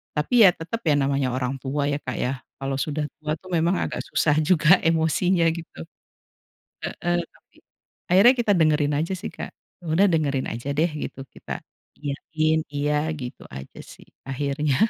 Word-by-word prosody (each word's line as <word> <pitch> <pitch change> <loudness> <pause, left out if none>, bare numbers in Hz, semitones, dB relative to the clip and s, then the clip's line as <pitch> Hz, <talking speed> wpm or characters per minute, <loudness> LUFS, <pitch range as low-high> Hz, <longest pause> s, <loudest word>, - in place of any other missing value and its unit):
tapi 220 +10 +4
ya - - +9
tetep 200 +8 -5
ya 145 - +5
namanya 140 -2 +1
orang 130 +1 -2
tua 140 +2 -2
ya 145 - -1
Kak 130 -3 -5
ya, 125 - 0 0.3
kalau 135 0 -3
sudah 150 +1 -1 0.2
tua 155 0 -2
tuh 185 +3 -14
memang 170 +3 +2
agak - - -3
susah 150 -2 +2
juga 165 +2 +5
emosinya 165 +2 +2
gitu. 170 - -9 1.1
Heeh, 175 0 -1
tapi - - -29 0.6
akhirnya 205 +8 +7
kita 230 -3 +2
dengerin 150 -2 +3
aja 165 +4 -1
sih - - -6
Kak, - - -7 0.3
ya - - -13
udah 190 +5 +4
dengerin 140 -5 0
aja 120 +5 -5
deh 165 +2 +3
gitu, - - -7 0.2
kita - - -11 0.5
iyain 155 +2 -1
iya 150 +2 0
gitu 125 - -7
aja 65 +1 -10
sih, - - -14 0.2
akhirnya. 140 +1 0
150 Hz, 165 wpm, -24 LUFS, 140-165 Hz, 1.1 s, ya